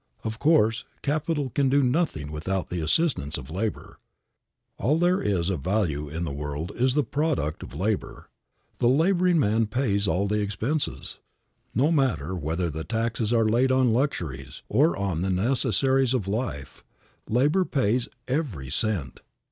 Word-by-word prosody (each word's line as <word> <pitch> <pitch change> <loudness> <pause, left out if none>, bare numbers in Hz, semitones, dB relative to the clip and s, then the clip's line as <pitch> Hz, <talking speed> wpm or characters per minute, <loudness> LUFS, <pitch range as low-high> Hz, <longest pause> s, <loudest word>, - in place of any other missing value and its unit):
Of 110 0 -4
course, 115 -7 +3 0.2
capital 150 -2 -1
can 140 +1 +2
do 140 +1 +3
nothing 125 - 0
without 90 +5 -3
the 90 -1 -2
assistance 80 - 0
of 70 +1 -9
labor. 105 +5 -4 0.8
All 150 +6 +2
there 175 +2 +2
is 95 -3 0
of 85 -7 -3
value 80 -5 -1
in 80 +4 -4
the 80 - -3
world 75 +5 -4
is 130 +2 +1
the 150 - +3
product 140 - -1
of - - -9
labor. 105 +5 -2 0.5
The 120 - +3
laboring 175 +5 +3
man 110 -3 +2
pays 105 -4 0
all 95 +1 +1
the 105 +1 0
expenses. 110 +9 -2 0.6
No 140 +8 +3
matter 125 - +1
whether 85 0 -2
taxes 115 0 -1
are 115 -2 +3
laid 125 +4 +3
on 130 -3 +3
luxuries 75 - -2
or 155 +5 +3
on 95 -4 -1
the 95 - 0
necessaries 130 +5 +2
of 105 -7 -2
life, 100 - -4 0.5
labor 145 - +3
pays 125 - 0 0.2
every 120 - -2
cent. 85 - -1
110 Hz, 150 wpm, -26 LUFS, 90-135 Hz, 0.8 s, course